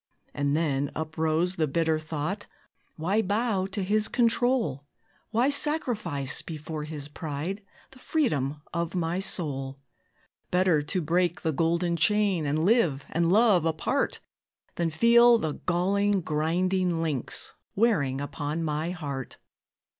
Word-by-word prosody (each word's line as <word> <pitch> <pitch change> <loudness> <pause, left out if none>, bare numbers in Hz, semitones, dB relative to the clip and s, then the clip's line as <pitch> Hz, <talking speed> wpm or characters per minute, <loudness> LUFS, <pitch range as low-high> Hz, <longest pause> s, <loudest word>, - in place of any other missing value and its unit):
And 145 +1 0
then 145 -3 0
uprose 160 +3 -1
the 155 -2 +1
bitter 160 +2 +1
thought, 155 +6 -4 0.5
"Why 190 +7 +1
bow 205 -1 0
to 195 0 -3
his 210 +3 +2
control? 235 - +1 0.5
Why 240 +5 +2
sacrifice, 215 - 0
before 155 -1 -6
his 150 -2 -6
pride, 155 +6 -5 0.3
The 265 - -16
freedom 150 - -1
of 170 +1 -2
my 175 0 -1
soul? 140 -8 -1 0.7
Better 180 -4 +3
to 180 +5 -2
break 175 +2 +1
the 160 -2 0
golden 170 +3 +1
chain, 190 -1 +2
And 155 +3 0
live 180 - +2
and 170 +1 +1
love 210 -4 +5
apart, 160 -2 -1 0.5
Than 170 -1 -1
feel 235 +7 +6
the 160 -8 -2
galling, 195 +3 +2
grinding 175 +3 0
links 150 -6 -2 0.2
Wearing 160 - +2
upon 145 +2 -3
my 155 +1 -2
heart." 145 -8 -5
170 Hz, 125 wpm, -27 LUFS, 150-200 Hz, 0.7 s, feel